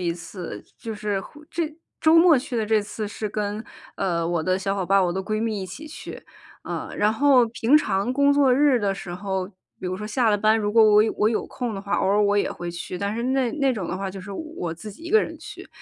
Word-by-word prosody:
一 175 -2 0
次， 170 - -8
就 225 -1 -6
是， 205 -2 -2 0.3
这 325 -2 -2 0.3
周 315 +1 +5
末 330 -2 +7
去 250 -1 -3
的 220 -2 0
这 215 -1 +2
次 210 +1 -5
是 210 +1 -4
跟， 210 +1 -3 0.3
呃， 170 -4 -1
我 170 -1 0
的 185 +3 +1
小 195 +1 -1
伙 195 -2 -2
伴 195 +2 +3
儿， 190 - +4
我 175 - -1
的 190 +2 -2
闺 215 +2 -2
蜜 220 -3 -1
一 - - -5
起 275 - -9
去， 305 - -9 0.4
啊。 - - -5
然 210 +1 +3
后 260 0 +5
平 230 +4 +3
常 205 -5 +1
工 280 +1 +4
作 280 -2 +4
日 270 -1 +4
的 200 -1 +1
时 175 -2 -7
候， 190 0 -3 0.3
比 - - -5
如 185 +1 -2
说 210 - -6
下 225 +2 +1
了 210 - +3
班， 215 +2 +3
如 205 -1 -1
果 225 0 +6
我 210 -1 +6
有 220 - 0
我 210 - +3
有 225 - -1
空 245 -3 -4
的 195 - -5
话， 200 0 -2
偶 - - +1
尔 205 +2 +3
我 205 0 +2
也 205 - +1
会 175 - -6
去， 175 +1 -6
但 200 +2 -2
是 235 - -3
那- 255 -1 +1
那 270 -1 +3
种 200 -7 -4
的 180 - -3
话 195 0 -3
就 195 +1 -8
是 195 +2 -8
我 195 - -5
自 190 +6 -9
己 220 +11 -13
一 340 - -6
个 435 +1 +5
人 - - -6
去， - - -10
210 Hz, 285 characters per minute, -24 LUFS, 190-245 Hz, 0.4 s, 末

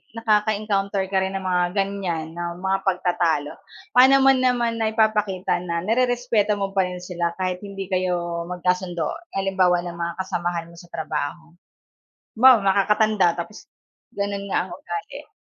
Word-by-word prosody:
nakaka-encounter 210 -3 +1
ka 190 - +1
rin 190 +1 -3
ng 190 - -9
mga 180 -1 +2
ganyan 180 -5 -2
na 175 0 -3
mga 195 +1 -1
pagtatalo? 175 -5 0 0.4
Paano 260 +2 +8
mo 270 - +7
naman 245 -2 +1
naipapakita 215 -5 +1
na 170 -1 -2
nirerespeto 235 -2 +1
mo 195 0 -2
pa 190 - +4
rin 180 0 -6
sila 175 -2 -2
kahit 185 -1 -1
hindi 195 -2 -6
kayo 175 -2 -1
magkasundo? 180 -2 -1 0.3
Halimbawa 190 -2 +2
ng 170 - -6
mga 170 0 -2
kasamahan 175 -3 -3
mo - - -15
sa 175 -1 -16
trabaho? 160 +1 -4 0.8
Halimbawa, 255 +1 +8
nakakatanda 200 0 +3
tapos, 210 +5 -8 0.5
ganun 200 0 -3
nga 190 - 0
ang - - -13
ugali? 415 +8 -7
190 Hz, 145 wpm, -23 LUFS, 175-210 Hz, 0.8 s, Paano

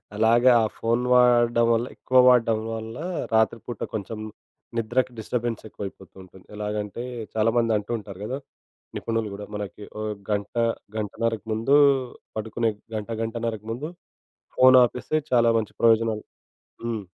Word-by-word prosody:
అలాగా. 115 +4 +5
ఆ - - +3
ఫోన్ 115 +2 0
వాడడం 120 -1 +5
వల్ల, 115 +2 +1
ఎక్కువ 130 - 0
వాడడం 115 -3 +4 0.2
వల్ల 110 +1 -6 0.4
రాత్రి 110 +1 +3
పూట 120 -4 -6
కొంచెం 110 +1 -4 0.6
నిద్రకు 125 +3 0
డిస్టర్బెన్స్ 115 0 -3
ఎక్కువైపోతుంటుంది. 95 -2 -10
ఎలాగంటే 105 +2 -4 0.3
చాలామందంటూ 115 -1 +1
ఉంటారు 100 -3 -10
కదా, 130 +4 -3 0.6
నిపుణులు 115 -2 -2
కూడా 105 - -7
మనకి 105 0 -6 0.2
ఓ - - -3 0.3
గంట, 100 -1 -2 0.4
గంటన్నరకు 110 +1 -2
ముందు 115 +6 +1 0.6
పడుకునే 110 +1 -1 0.3
గంట, 105 +1 -4
గంటన్నరకు 115 -1 -3
ముందు 125 +7 -4 0.7
ఫోన్ 130 0 +8
ఆపేస్తే 125 +5 -1
చాలా 120 -2 +5
మంచి 110 -2 -3
ప్రయోజనాలు. 115 -1 +3 0.6
హ్మ్. 115 -3 -2
115 Hz, 120 wpm, -25 LUFS, 105-120 Hz, 0.7 s, ఫోన్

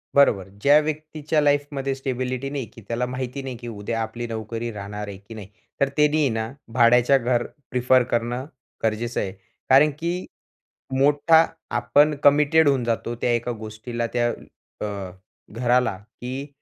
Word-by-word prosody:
बरोबर, 105 -9 +4
ज्या 145 +2 +6
व्यक्तीच्या 155 0 -2
लाईफमध्ये 145 -2 0
स्टेबिलिटी 130 0 -3
नाही, 140 -3 -3
की 115 - -13
त्याला 120 +1 -1
माहिती 130 +2 -4
नाही, 130 -2 -5
की 120 0 -9
उद्या 115 +1 -3
आपली 115 +2 -4
नोकरी 115 +1 -4
राहणार 105 0 -6
आहे 100 -1 -7
की 100 +3 -13
नाही. 105 -3 -9 0.3
तर 140 - +4
त्यानी 150 0 +4
ना 110 0 -2 0.2
भाड्याच्या 125 +2 +5
घर 120 -1 0 0.3
प्रिफर 125 0 +4
करणं 120 +2 -1 0.4
गरजेचं 115 +2 -1
आहे. 95 - -3 0.4
कारण 140 +4 +7
की 175 +2 -2 0.7
मोठा 150 +3 +5 0.3
आपण 145 +6 +4
कमिटेड 150 +2 +5
होऊन 130 -3 +1
जातो 115 0 -2
त्या 120 - +2
एका 120 +1 -1
गोष्टीला, 115 +1 -5
त्या 120 -1 +2 0.5
अ, - - -1 0.7
घराला, 120 -2 +1
की 125 +6 -7
125 Hz, 150 wpm, -23 LUFS, 115-140 Hz, 0.7 s, कारण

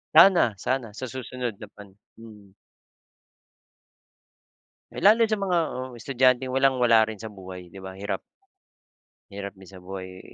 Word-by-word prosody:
Sana 175 - +7
sana. 125 -2 -2
Sa 130 +5 -6
susunod 125 -2 -5
na 105 - -10
pan 100 -2 -15 0.2
mm. 105 -3 -14 2.4
Eh, - - -6
lalo 220 +3 +6
sa 215 -2 +1
mga 190 -3 +1
oo, 130 0 -6
estudyanteng 130 +1 +2
walang 135 0 +3
wala 115 -3 +4
rin 110 - -5
sa 110 +1 -9
buhay, 90 -3 -10
di 95 - -11
ba? 95 0 -9
Hirap 100 0 -3 1.1
hirap 100 0 -7
din 95 0 -15
sa 95 - -12
buhay. 95 0 -8
110 Hz, 145 wpm, -25 LUFS, 100-130 Hz, 2.4 s, Sana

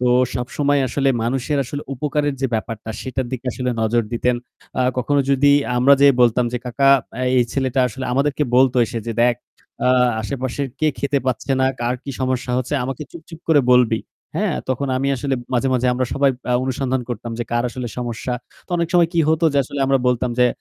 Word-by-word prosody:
তো 125 - +2 0.3
সবসময় 140 +3 0
আসলে 135 -1 0
মানুষের 135 +4 -1
আসলে 145 +3 -5
উপকারের 145 +1 -1
যে 135 - +2
ব্যাপারটা 110 0 -4
সেটার 130 -1 -3
দিকে 130 0 -5
আসলে 125 -1 -2
নজর 115 +1 +2
দিতেন। 120 +1 +1 0.4
আ - - +4 0.2
কখনো 140 +3 +2
যদি 140 +1 +4 0.2
আমরা 135 +3 +6
যে 140 - +8
বলতাম 120 0 +4
যে, 125 - -1
"কাকা, 135 +3 +2 0.3
আ - - -1 0.2
এই 120 - +4
ছেলেটা" 130 -1 0
আসলে 130 +3 -6
আমাদেরকে 140 +3 +1
বলত 130 -1 +4
এসে 115 - -4
যে, 115 - -2
"দেখ 120 0 +4 0.5
আ - - +4 0.3
আশেপাশের 130 +3 -3
কে 155 - +3
খেতে 140 +4 0
পাচ্ছে 130 +2 -1
না, 130 - +3
কার 120 +1 0
কি 140 - -6
সমস্যা 130 -1 -1
হচ্ছে 130 +4 -3
আমাকে 135 +3 -4
চুপ 170 - -11
চুপ 165 -2 -11
করে 150 -3 +5
বলবি।" 120 -3 +4 0.4
হ্যাঁ, 195 -3 0
তখন 130 +2 -1
আমি 135 +2 0
আসলে 135 +1 -1 0.2
মাঝে, 125 +2 +1
মাঝে 125 0 +1
আমরা 125 0 -1
সবাই 140 0 +3 0.2
আ - - +3
অনুসন্ধান 130 0 -1
করতাম 120 0 -5
যে 120 - -2
কার 120 0 +1
আসলে 125 -2 -5
সমস্যা। 120 +1 -3 0.3
তো - - -32
অনেক 170 -1 0
সময় 170 -2 +4
কি 170 - +2
হতো 160 +1 +2
যে 140 - +2
আসলে 140 +2 -5
আমরা 135 0 +3
বলতাম 125 0 0
যে, 125 - +6
130 Hz, 205 wpm, -20 LUFS, 125-140 Hz, 0.5 s, যে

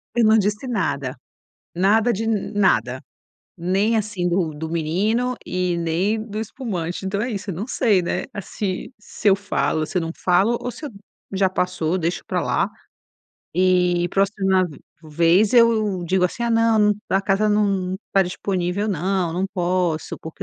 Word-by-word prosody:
Eu 240 - +3
não 220 +1 +6
disse 210 +5 0
nada, 140 - -2 0.6
nada 215 +6 +3
de 225 +2 -2
nada, 190 - +1 0.6
nem, 195 +6 +1
assim, 205 -4 -1
do 175 -2 +1
do 160 +2 -6
menino 205 +10 0
e 180 -1 -1
nem 175 +6 0
do 215 -1 -5
espumante. 195 -6 -4
Então 200 +1 -1
é 245 - -2
isso: 200 -1 -4
eu 180 - -4
não 200 +7 -4
sei, 210 -10 +2
né, 170 - -2 0.2
se 195 +6 -4
se 210 - -2
eu 195 - +5
falo, 160 -5 -1
se - - -7
eu - - -1
não 165 - -3
falo, 195 +6 +3
ou 245 - -3
se 310 - -10
eu - - -7 0.4
já 190 0 +2
passou, 180 -2 -1
deixo 175 0 -2
pra - - -1
lá, - - +1 0.8
e 180 -1 +2
próxima 195 -1 +2
v 145 - -12 0.2
vez 170 +6 +3
eu 220 -6 +3
digo, 185 +1 +2
assim: 235 +6 -1
"Ah, 235 - 0
não, 225 -2 +4 0.2
a 195 - +3
casa 195 +2 +1
n 210 - +3
não 195 -3 0 0.2
tá 195 - +5
disponível, 180 +2 -2
não. 185 -1 0
Não 185 +3 -1
posso 175 -3 -1
porque 160 - -8
190 Hz, 170 wpm, -22 LUFS, 175-215 Hz, 0.8 s, não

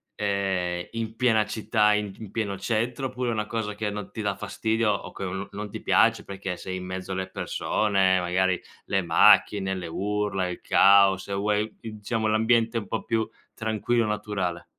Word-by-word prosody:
ehm, 95 -3 -1
in 115 -1 -4
piena 115 -3 +3
città 105 -1 +2
in 105 -1 -1
pi 105 +1 -10
pieno 105 -3 -2
centro 115 +6 -1
oppure 125 -1 -3
è - - -1
una 110 -1 -2
cosa 110 -2 -3
che 105 0 -2
non 105 -1 -6
ti 110 - -5
dà 100 -2 -1
fastidio 110 +2 0
o 100 - -4
che - - -7
o 90 - -3
non 95 +1 -4
non 105 +1 -6
ti - - -7
piace - - +3
perché 95 -1 -5
sei 95 +1 -5
in 90 - -6
mezzo 95 +1 -5
alle 95 0 -3
persone, 95 -1 +1
magari 90 0 +1 0.2
le 95 - +1
macchine, 95 +3 +4
le 90 -2 -5
urla, 100 +1 -1
il 90 - -6
caos 100 -1 +5
e 100 - -4
vuoi 105 +2 0
diciamo 110 0 -3
l'ambiente 115 +1 +2
un 105 -3 -4
po' - - -3
più 110 -1 0 0.3
tranquillo, 110 +1 0
naturale? 105 -5 -3
105 Hz, 185 wpm, -26 LUFS, 95-110 Hz, 0.3 s, caos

